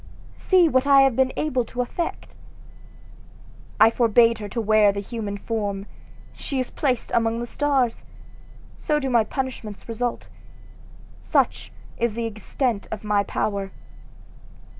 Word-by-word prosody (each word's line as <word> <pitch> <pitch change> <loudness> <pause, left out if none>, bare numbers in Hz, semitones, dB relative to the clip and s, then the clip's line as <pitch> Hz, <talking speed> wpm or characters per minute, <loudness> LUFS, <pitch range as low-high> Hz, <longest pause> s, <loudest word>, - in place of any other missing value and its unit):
See 365 -3 +4
what 260 -2 +2
I 275 -1 +7
have 270 -3 +3
been 260 +1 +2
able 260 -5 0
to 245 +2 -4
effect! 335 +7 -5 1.4
I 220 +1 +7
forbade 230 0 +4
her 205 -1 -6
to 235 - -3
wear 215 -2 +4
the 200 - -4
human 205 -1 -5
form 205 -2 -3 0.5
she 275 -3 -4
is 255 - -3
placed 255 -5 -1
among 230 0 +1
the 240 - -3
stars! 265 -2 0 0.8
So 300 - 0
do 270 -3 -2
my 235 -2 +4
punishments 235 -4 -5
result 240 +1 -3 0.9
such - - 0 0.3
is 235 -2 0
the 235 0 -2
extent 225 +1 -2
of 220 - -6
my 210 -1 +2
power! 200 -1 -2
230 Hz, 140 wpm, -23 LUFS, 215-260 Hz, 1.4 s, I